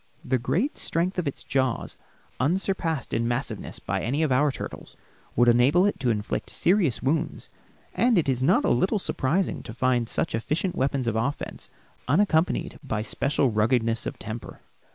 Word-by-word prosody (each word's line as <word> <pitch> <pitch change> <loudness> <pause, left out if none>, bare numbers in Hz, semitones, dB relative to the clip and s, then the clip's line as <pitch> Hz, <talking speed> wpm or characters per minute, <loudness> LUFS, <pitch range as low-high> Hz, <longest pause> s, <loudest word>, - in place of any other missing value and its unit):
The 130 - +1
great 155 - -1
strength 180 +3 0
of 170 - -2
its 140 - -3
jaws, 130 -3 -1 0.4
unsurpassed 165 0 0
in 115 0 +1
massiveness 120 0 -3
by - - -3
any 140 +8 0
of 155 - +1
our 140 +3 +3
turtles, - - -8 0.4
would 120 +1 +4
enable 130 +10 +5
it 205 - 0
to 125 - 0
inflict 105 -2 -2
serious 175 - +2
wounds, 155 +5 -1 0.4
and 240 -3 +3
it 165 - +2
is 130 -2 0
not 135 - +3
a - - +3
little 190 - +2
surprising 180 -1 0
to 110 - -9
find 125 -2 +1
such - - -1
efficient 155 - -1
weapons 135 -1 0
of 115 -2 0
offense 130 +6 -3 0.4
unaccompanied 165 +3 +1
by 110 -6 -2
special 135 +3 +1
ruggedness 115 +1 +1
of - - -5
temper. 110 +1 -7
135 Hz, 165 wpm, -26 LUFS, 120-170 Hz, 0.4 s, enable